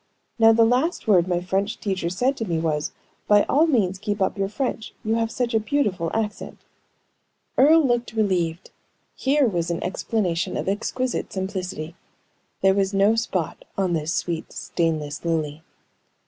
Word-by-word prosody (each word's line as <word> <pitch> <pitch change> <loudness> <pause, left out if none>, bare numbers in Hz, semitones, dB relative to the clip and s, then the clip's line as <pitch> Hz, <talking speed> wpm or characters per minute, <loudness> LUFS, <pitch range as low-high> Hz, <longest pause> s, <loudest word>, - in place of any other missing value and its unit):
Now 225 0 +7
the 225 0 +5
last 255 +8 +1
word 185 -4 +4
my 175 -1 0
French 195 +3 -1
teacher 190 -4 -2
said 250 +10 0
to 225 - -2
me 170 -2 0
was, 155 -2 -1 0.4
'By 205 0 +6
all 310 +4 +3
means 195 - +1
keep 205 +1 -2
up 190 - +1
your 195 -1 -1
French; 230 0 -3
you 220 0 0
have 225 0 +1
such 240 +1 -2
a 220 - +4
beautiful 210 -8 0
accent.'" 215 -2 -4 0.9
Earle 310 +3 +6
looked 240 -2 0
relieved. 180 -6 0 0.4
Here 280 +1 +2
was 175 -7 -1
an 170 - -2
explanation 180 -2 -1
of - - -3
exquisite 240 +5 -2
simplicity. 185 -4 -4 0.7
There 195 0 +5
was 195 0 0
no 200 +3 +4
spot 200 -8 -2
on 190 -3 +1
this 160 -1 -1
sweet, 170 -2 -2
stainless 155 -4 -2
lily. 160 -2 -1
195 Hz, 160 wpm, -23 LUFS, 175-225 Hz, 0.9 s, Now